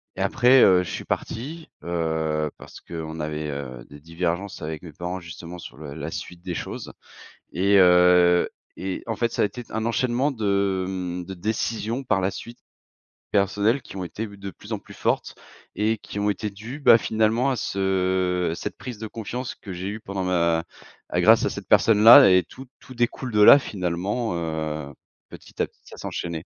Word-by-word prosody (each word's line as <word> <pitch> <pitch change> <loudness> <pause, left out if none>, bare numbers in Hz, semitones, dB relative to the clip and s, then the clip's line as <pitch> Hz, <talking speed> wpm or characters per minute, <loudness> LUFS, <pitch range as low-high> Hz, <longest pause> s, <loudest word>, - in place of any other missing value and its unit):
et - - -5
après, 125 +1 +5
heu, 90 -1 +5
je 90 - -7
suis - - -5
parti, 155 +8 -4
heu, 80 -3 -1
parce - - -13
qu'on 80 -1 -7
avait, 75 0 -3
heu, 65 -3 -7
des 70 0 -13
divergences 85 +4 -3
avec 80 -1 -5
mes 85 - -9
parents, 90 +4 -5
justement, 85 +1 -9
sur - - -11
le 75 -2 -8
la 80 +1 -6
suite 85 +1 -7
des 90 -2 -4
choses, - - -6 0.6
et 100 +2 +3
heu, 90 -1 +5 0.3
et 95 0 -4
en 115 - -2
fait, 115 +1 0
ça - - +1
a - - +5
été 120 +3 -6
un 110 0 -3
enchaînement 125 +4 +1
de, 100 -5 0
mmh, 90 -1 -4
de 95 - -7
décisions, 110 +5 -2
par 110 -6 +1
la 95 +1 0
suite, 120 +4 -9 0.7
personnelles 105 +5 +2
qui - - -11
ont 95 - -3
été 105 +7 -5
de 100 -1 -8
plus 85 - -11
en - - -1
plus - - -14
fortes - - -1 0.4
et 110 +2 0
qui 100 - -8
ont 105 - 0
été 105 +1 -3
dues, 110 +8 -9
bah, 115 -5 +7
finalement, 110 +5 +1
à 130 - 0
ce 95 -3 0
à - - -2
cette - - -6
prise 125 -4 -8
de 110 - -5
confiance 120 +4 -5
que 100 - -10
j'ai 90 +1 -5
eue 110 +2 -5
pendant 95 -2 -4
ma 85 -2 +1 0.4
à - - 0
grâce - - +6
à - - 0
cette - - -8
personne-là 115 +4 +8
et 90 0 +5
tout 135 0 -12
tout 130 - -13
découle 120 +1 -2
de 105 - +2
là 120 - +10
finalement, 95 0 -2
heu, 80 -3 -4 0.4
petit - - -13
à - - 0
petit, - - -34
ça - - -13
s'enchaînait. 85 -2 -5
95 Hz, 195 wpm, -24 LUFS, 85-110 Hz, 0.7 s, là